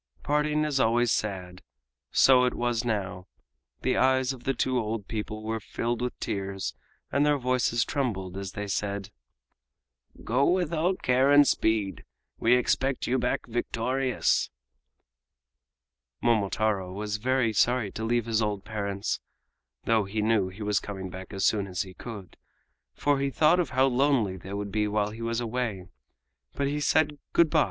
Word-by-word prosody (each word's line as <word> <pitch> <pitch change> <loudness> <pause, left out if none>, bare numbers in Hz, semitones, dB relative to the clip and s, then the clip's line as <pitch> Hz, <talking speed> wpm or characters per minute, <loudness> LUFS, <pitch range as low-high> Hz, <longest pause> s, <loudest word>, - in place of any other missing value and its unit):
Parting 150 +1 +1
is 145 -3 0
always 120 0 +3
sad. 90 -4 -2 0.5
So 130 -1 +5
it 125 - 0
was 120 -1 0
now. 100 -6 -3 0.6
The 130 - +1
eyes 130 0 +3
of 125 -2 -13
the 135 - 0
two 130 +1 +1
old 110 -2 -3
people 110 0 -4
were 110 +1 -2
filled 120 +3 -3
with 125 0 -3
tears 100 -2 -3 0.4
and 140 - +2
their 150 0 +3
voices 125 -2 +1
trembled 100 -10 -2
as 95 -1 -5
they 105 - -4
said: 100 +1 -3 1.1
"Go 125 +5 +2
with 175 -2 +1
all 170 +4 +1
care 130 -3 +2
and 145 0 +7
speed. 105 -7 0 0.4
We 115 +2 +4
expect 130 +1 +1
you 130 +2 +1
back 125 +1 -1
victorious!" 125 +2 0 1.7
Momotaro 105 -4 +1
was 105 +2 -3
very 125 0 +1
sorry 120 -1 +2
to 110 - -6
leave 120 0 +1
his 115 -1 +1
old 105 -2 -2
parents 100 -2 -2 0.6
(though 110 -3 +2
he 105 +2 -2
knew 110 -3 +2
he 100 +3 -8
was 105 -1 +1
coming 95 -2 -6
back 95 0 -9
as 95 -2 -1
soon 100 -2 +2
as 95 +2 -2
he 95 -1 -11
could), 105 -3 -9 0.6
for 145 -1 +1
he 140 0 0
thought 155 +6 +4
of 170 -6 0
how 130 0 +3
lonely 130 -6 +2
they 95 +2 -9
would 100 0 -4
be 105 0 +1
while 105 0 0
he 110 +2 -9
was 115 0 -1
away. 115 -5 -2 0.7
But 140 - -1
he 145 +2 -1
said 150 0 +2
"Good 170 -3 +4
by!" 160 - +4
115 Hz, 165 wpm, -27 LUFS, 100-130 Hz, 1.7 s, and